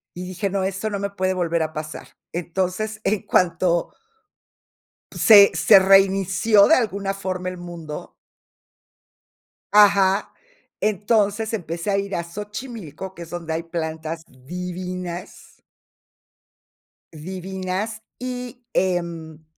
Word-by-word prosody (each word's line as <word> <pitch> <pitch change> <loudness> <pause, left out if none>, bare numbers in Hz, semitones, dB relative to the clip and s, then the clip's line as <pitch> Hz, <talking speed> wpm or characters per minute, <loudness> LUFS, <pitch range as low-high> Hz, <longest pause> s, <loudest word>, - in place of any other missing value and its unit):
Y 180 - -6
dije: 190 +2 -2
"No, 195 0 -1
esto 195 +3 -2
no 200 - -2
me 200 0 -2
puede 185 -1 0
volver 170 -2 0
a 155 0 -2
pasar". 155 0 -6 0.3
Entonces, 185 +5 -2
en 210 -2 0
cuanto 175 -1 +1 1.2
se 205 -3 +8
se - - +7
reinició 195 +2 +5
de 320 - +6
alguna 200 -4 -1
forma 185 -2 -3
el 185 - -7
mundo 170 -3 -8 1.6
Ajá. 200 -1 +5 0.5
Entonces, 210 +1 +1
empecé 175 0 -3
a 195 - +2
ir 200 0 -2
a 170 - -1
Xochimilco, 205 - -7
que 170 - -10
es 165 - -12
donde 170 -2 -4
hay 165 +1 -2
plantas 160 -1 -4
divinas 180 +5 -7 1.5
divinas. 190 +5 -4 0.2
Y, 250 -1 -6
em, 170 -4 -2
185 Hz, 115 wpm, -22 LUFS, 170-200 Hz, 1.6 s, se